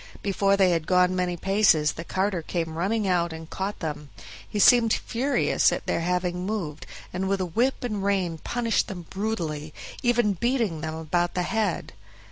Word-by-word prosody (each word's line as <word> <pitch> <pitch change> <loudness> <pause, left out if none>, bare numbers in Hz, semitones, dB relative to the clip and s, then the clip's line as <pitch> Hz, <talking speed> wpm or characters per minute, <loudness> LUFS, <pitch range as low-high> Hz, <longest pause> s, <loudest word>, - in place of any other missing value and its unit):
Before 200 0 +2
they 190 -2 +4
had 165 -2 -1
gone 180 0 +3
many 180 -1 -1
paces 190 -5 +3
the 165 - -7
carter 190 0 -1
came 165 0 -3
running 200 +5 0
out 175 -2 +1
and 160 0 -8
caught 195 +4 -4
them. 150 -3 -5 0.4
He - - -4
seemed 230 +2 +6
furious 265 +4 +1
at - - -3
their - - 0
having 180 +1 -1
moved, 185 -7 -4 0.3
and 190 +1 -2
with 195 0 +1
whip 225 +11 0
and 210 -5 -2
rein 185 -5 0
punished 235 +2 0
them 180 -4 -7
brutally, 165 -8 -3 0.3
even 240 -4 +2
beating 225 - 0
them 160 0 -4
about 170 +2 -1
the 180 - +1
head. 210 -1 -1
185 Hz, 170 wpm, -26 LUFS, 170-210 Hz, 0.4 s, seemed